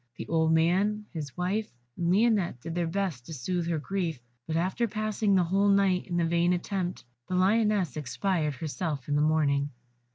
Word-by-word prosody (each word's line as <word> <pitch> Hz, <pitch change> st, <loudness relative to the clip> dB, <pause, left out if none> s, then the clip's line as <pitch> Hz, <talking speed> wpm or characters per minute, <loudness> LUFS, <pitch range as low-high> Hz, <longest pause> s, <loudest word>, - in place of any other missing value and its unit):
The -, -, -6 dB
old 160 Hz, -1 st, +2 dB
man, 190 Hz, +6 st, +2 dB
his 150 Hz, -4 st, -6 dB
wife, 195 Hz, +5 st, -1 dB, 0.3 s
and 170 Hz, -1 st, -1 dB
Lionette 205 Hz, -, +2 dB
did 165 Hz, -, -5 dB
their 175 Hz, -1 st, 0 dB
best 170 Hz, -8 st, -2 dB
to 160 Hz, -, -6 dB
soothe 175 Hz, +6 st, -2 dB
her 165 Hz, -, 0 dB
grief; 165 Hz, -2 st, -2 dB, 0.3 s
but 160 Hz, -, -2 dB
after 185 Hz, +8 st, 0 dB
passing 215 Hz, -1 st, 0 dB
the 185 Hz, -, +4 dB
whole 195 Hz, +4 st, +2 dB
night 195 Hz, -2 st, +3 dB
in 175 Hz, -2 st, -2 dB
the 170 Hz, -, +2 dB
vain 170 Hz, +1 st, +2 dB
attempt, 180 Hz, 0 st, -3 dB, 0.2 s
the 185 Hz, -, -2 dB
Lioness 200 Hz, -, +2 dB
expired 155 Hz, +1 st, -1 dB
herself 155 Hz, -3 st, -4 dB
in 145 Hz, -, 0 dB
the 145 Hz, -, +3 dB
morning. 145 Hz, -2 st, +2 dB
175 Hz, 185 wpm, -28 LUFS, 160-195 Hz, 0.3 s, the